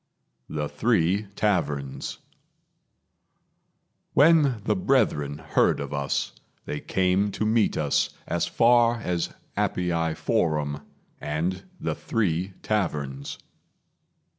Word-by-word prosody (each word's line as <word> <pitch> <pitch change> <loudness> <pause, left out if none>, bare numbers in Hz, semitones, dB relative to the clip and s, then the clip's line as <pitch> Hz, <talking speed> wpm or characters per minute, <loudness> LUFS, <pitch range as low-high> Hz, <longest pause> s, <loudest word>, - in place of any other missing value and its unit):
The 75 -1 -2
Three 95 +4 +1
Taverns 75 -11 -1 2.0
When 145 -5 +5
the 105 - +1
brethren 90 - +1
heard - - +2
of 70 0 -5
us, 70 -1 -1 0.3
they 75 - -3
came 95 +2 +1
to 110 - -1
meet 110 0 +2
us 75 -2 +1 0.2
as 85 0 -1
far 120 +4 +4
as 90 -4 -1 0.3
Appii 85 -3 0
Forum, 75 -2 0 0.4
and 80 +5 -2
The - - -1
Three 95 -4 -1
Taverns. 75 -10 -2
90 Hz, 95 wpm, -26 LUFS, 75-110 Hz, 2.0 s, When